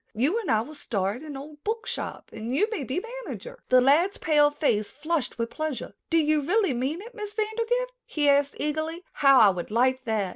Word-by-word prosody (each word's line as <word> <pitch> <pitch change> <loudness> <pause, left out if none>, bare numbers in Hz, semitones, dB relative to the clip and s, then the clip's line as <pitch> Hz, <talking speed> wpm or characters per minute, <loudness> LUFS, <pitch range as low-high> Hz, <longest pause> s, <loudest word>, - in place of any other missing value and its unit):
You 290 - +2
and 435 - -5
I 220 -1 +3
will 295 +7 -8
start 210 -5 -2
an 300 -3 -7
old 295 +2 -11
book 445 +1 -2
shop - - -5
and 225 +3 -4
you 415 +9 +3
may 410 -10 -2
be 275 - -3 0.2
manager." - - -8
The 255 0 +6
lad's 315 +10 +3
pale 295 -2 +4
face 230 -9 0
flushed 310 -2 -2
with 230 0 -2
pleasure. 310 -4 -4 0.2
"Do 330 - +3
you 305 -1 +3
really 380 +1 +2
mean 270 +8 -2
it, 475 +2 -11
Miss 420 -2 -6
Vandergrift?" 460 +3 -1 0.2
he 295 -2 0
asked 280 0 +3
eagerly. 315 +3 -2
"How 275 -2 +5
I 215 -4 +8
would 180 -2 -3
like 255 +4 +2
that." 215 -4 0
295 Hz, 210 wpm, -26 LUFS, 255-360 Hz, 0.2 s, I